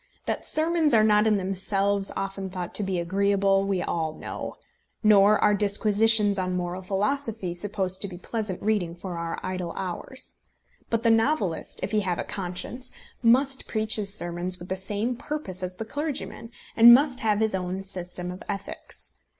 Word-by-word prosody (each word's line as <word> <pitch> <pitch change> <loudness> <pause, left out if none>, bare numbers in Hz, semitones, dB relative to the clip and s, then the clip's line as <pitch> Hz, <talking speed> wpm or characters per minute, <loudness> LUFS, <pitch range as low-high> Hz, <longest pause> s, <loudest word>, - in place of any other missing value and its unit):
That - - -3
sermons 315 -3 +2
are 215 - +5
not 210 0 +4
in 215 -1 +3
themselves 195 +1 0
often 195 0 -4
thought 180 -1 -5
to - - +2
be 190 -2 -1
agreeable 195 +2 +2
we 190 -2 0
all 160 -2 -2
know. - - -6 0.5
Nor 210 0 +6
are 210 - +3
disquisitions 205 0 +4
on 185 -1 -1
moral 180 +1 -3
philosophy 205 0 -1
supposed 190 0 -2
to 200 - +2
be 180 -2 -8
pleasant 210 0 -4
reading 200 -6 0
for 175 -1 -6
our 165 0 -4
idle 185 -2 -3
hours. 195 +8 -4 0.5
But 230 0 0
the 230 - +5
novelist, 225 - 0
if - - -2
he 215 - +2
have 185 -4 -1
a - - -2
conscience, 195 +7 -5 0.3
must 260 +3 +3
preach 220 -1 +1
his 200 -2 -2
sermons 175 -2 -3
with 175 0 -11
the 190 - 0
same 205 +6 -1
purpose 275 -11 -5
as 185 0 -4
the 225 - -5
clergyman, 290 -3 -4 0.3
and 235 +1 +10
must 270 -1 +1
have 210 -2 +1
his 220 -1 +1
own 185 +1 -3
system 180 -1 -4
of 180 - -9
ethics. 195 - -7
200 Hz, 175 wpm, -26 LUFS, 185-220 Hz, 0.5 s, and